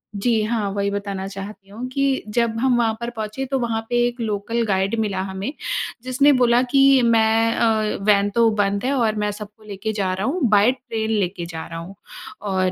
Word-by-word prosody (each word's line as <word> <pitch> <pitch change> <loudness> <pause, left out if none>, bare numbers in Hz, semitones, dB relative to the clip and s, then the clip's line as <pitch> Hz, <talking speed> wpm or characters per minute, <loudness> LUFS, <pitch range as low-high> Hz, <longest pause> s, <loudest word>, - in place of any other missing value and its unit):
जी 220 +2 +1
हाँ, 215 -2 -1
वही 200 0 -1
बताना 200 -1 -4
चाहती 195 0 -9
हूँ 235 +5 -6
कि 275 0 0
जब 230 -1 +1
हम 250 -1 +2
वहाँ 225 -2 +2
पर 235 0 -3
पहुँचे 225 +3 -5
तो 270 +1 -1
वहाँ 230 -2 -1
पे 240 - -1
एक 245 0 -6
लोकल 220 +2 -2
गाइड 195 +1 0
मिला 195 -3 -1
हमें, 195 +8 -4 0.5
जिसने 260 +3 +3
बोला 245 -1 +4
कि 275 -1 +6
मैं 225 0 +3
अ, 220 -2 +1
वैन 205 -1 +4
तो 230 -1 +5
बंद 200 +1 0
है 275 - +1
और 225 -5 +1
मैं 210 0 -1
सबको 210 +1 -10
लेके 210 +1 -4
जा 190 -3 -1
रहा 190 +3 -2
हूँ 340 +5 -1
बाय 210 +3 +5
ट्रेन 230 -4 -4
लेके 185 -4 -1
जा 165 -1 -6
रहा 165 0 -6
हूँ। 185 +4 -9 0.6
और 185 -1 +1
220 Hz, 205 wpm, -21 LUFS, 200-240 Hz, 0.6 s, कि